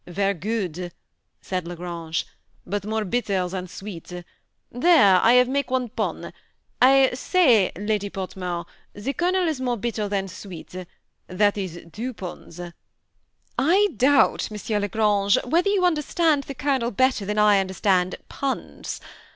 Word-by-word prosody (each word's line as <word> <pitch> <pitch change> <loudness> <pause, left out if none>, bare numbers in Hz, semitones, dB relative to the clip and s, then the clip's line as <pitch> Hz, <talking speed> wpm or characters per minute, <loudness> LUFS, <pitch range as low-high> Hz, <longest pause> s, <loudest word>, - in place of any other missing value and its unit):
Ver* 195 +3 0
good," 180 -2 -3 0.5
said 185 -2 -3
La 175 - -6
Grange, 170 -2 -4 0.4
but 200 +2 -3
more 220 +1 -2
bitter 200 -4 0
than 185 0 -5
sweet. 180 -2 -9 0.6
There, 245 - +5
I 230 - +5
have 250 0 +6
make 280 +2 -1
one 255 -2 0
pon. 230 - -4 0.5
I 265 +1 +6
say. 250 - +3
Lady 205 0 -1
Portmore, 180 -3 -5 0.3
the 230 +7 -4
Colonel 360 +2 +1
is 305 -5 -2
more 245 -2 -1
bitter 220 -1 -2
than 195 -1 -1
sweet; 185 -2 -10 0.5
that 205 +3 +2
is 185 -4 -5
two 240 +7 -5
pons." 175 -2 -9 0.6
" - - -13 0.2
I 410 +1 +4
doubt, 275 -3 +3
M. 210 0 -2
la 205 - 0
Grange, 205 -2 +2
whether 340 +9 +2
you 395 -3 +2
understand 315 -2 +1
the 275 - -7
Colonel 270 -4 0
better 255 -1 +1
than 210 +2 -3
I 210 -1 +5
understand 190 -1 +1
puns. 275 -1 -4
210 Hz, 145 wpm, -24 LUFS, 190-260 Hz, 0.6 s, have